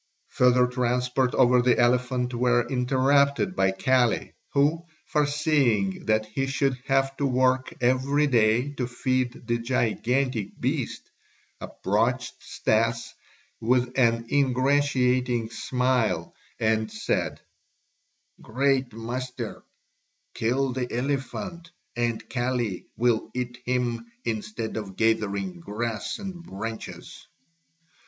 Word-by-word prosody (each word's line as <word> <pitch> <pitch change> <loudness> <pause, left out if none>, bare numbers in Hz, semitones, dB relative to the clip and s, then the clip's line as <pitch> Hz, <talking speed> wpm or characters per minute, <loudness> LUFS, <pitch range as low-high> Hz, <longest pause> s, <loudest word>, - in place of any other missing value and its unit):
Further 125 0 +4
transports 125 +1 0
over 125 0 +5
the 125 0 +3
elephant 125 +1 +1
were 120 0 +2
interrupted 140 +5 +2
by 95 - +3
Kali 120 +4 +1 0.2
who, 150 +4 +2 0.2
foreseeing 145 -10 +1
that 110 0 +2
he 135 +5 -2
should 135 0 +1
have 135 0 +2
to 140 - +1
work 130 0 +2
every 130 +4 +2
day 120 0 +3
to 125 - -1
feed 125 0 -1
the 120 0 0
gigantic 120 -1 -1
beast, - - -3 0.5
approached - - -1
Stas 115 +1 0 0.5
with 125 +2 +1
an 115 -3 +3
ingratiating 130 -3 +2
smile 125 -1 0 0.3
and 110 0 +1
said: 110 - -2 1.0
"Great 130 0 0
master, 125 +3 -5 0.7
kill 125 +3 0
the 125 -1 -3
elephant, 145 +7 -3 0.3
and 120 -1 -1
Kali 120 -6 -2
will 120 -1 +1
eat 125 0 -4
him 125 - -1 0.2
instead 110 0 -3
of 100 -3 -6
gathering 100 -5 0
grass 105 +4 -3
and 190 -4 -7
branches." 110 - -7
125 Hz, 105 wpm, -26 LUFS, 115-130 Hz, 1.0 s, over